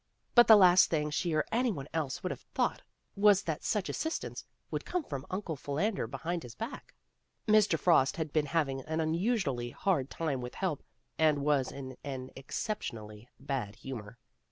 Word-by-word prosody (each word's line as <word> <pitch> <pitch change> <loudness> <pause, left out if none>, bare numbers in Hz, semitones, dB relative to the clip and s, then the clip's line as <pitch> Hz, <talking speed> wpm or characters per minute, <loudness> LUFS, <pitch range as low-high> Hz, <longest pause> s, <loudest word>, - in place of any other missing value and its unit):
But 240 -1 +7
the 220 - +10
last 185 -2 +7
thing 150 -2 0
she 170 +3 -1
or 155 - +2
any 245 +1 +2
one 140 -7 -6
else 155 -5 -2
would - - -1
have - - -6
thought - - +1 0.3
was 200 -1 +5
that 160 -2 -3
such 210 -3 0
assistance 320 +1 -3 0.3
would - - -2
come 360 -2 -2
from 140 - -6
Uncle 185 -4 -3
Philander 155 +10 -1
Behind 170 +1 -3
His 120 -4 -10
Back. 230 +4 -7 0.5
Mr. 215 -1 +5
Frost 165 -2 +3
had 160 -3 -3
been 150 -2 +2
having 135 -4 0
an 160 +1 -2
unusually 160 - 0
ha 195 +10 +1
rd 135 -5 -2
time 145 -6 -2
with 125 0 -7
help 185 -6 -2 0.4
and 150 -3 +3
was 140 -3 +2
in 130 -2 -8
an 130 -2 -5
exceptionally 115 - -5
bad 135 -7 -3
humor. 115 -2 -8
155 Hz, 180 wpm, -31 LUFS, 135-190 Hz, 0.5 s, the